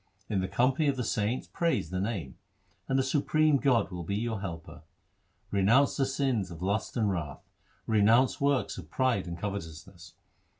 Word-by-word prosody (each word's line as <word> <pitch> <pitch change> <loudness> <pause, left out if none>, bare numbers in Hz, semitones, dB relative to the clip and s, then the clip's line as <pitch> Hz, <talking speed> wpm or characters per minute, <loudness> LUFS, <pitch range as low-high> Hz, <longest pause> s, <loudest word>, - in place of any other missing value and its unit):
In 100 -4 0
the 95 - -2
company 130 +8 +2
of 140 - +2
the 125 - -1
saints 110 +3 -1
praise 165 - -1
the 90 - -2
Name, 95 - -3 0.5
and 135 - +1
the 135 - +3
Supreme 150 +2 +2
God 130 -7 +2
will 90 -1 -5
be 95 +4 -3
your 110 -1 -2
Helper. 85 -3 -7 0.7
Renounce 110 +8 +3
the 135 - +1
sins 135 -8 0
of 85 0 -8
lust 100 +4 -1
and 105 -3 +2
wrath; 80 -6 -4 0.4
Renounce 115 +5 +3
works 140 -7 +1
of 80 -3 -11
pride 120 -3 0
and 85 0 -5
covetousness. 85 -5 -7
110 Hz, 170 wpm, -29 LUFS, 95-130 Hz, 0.7 s, the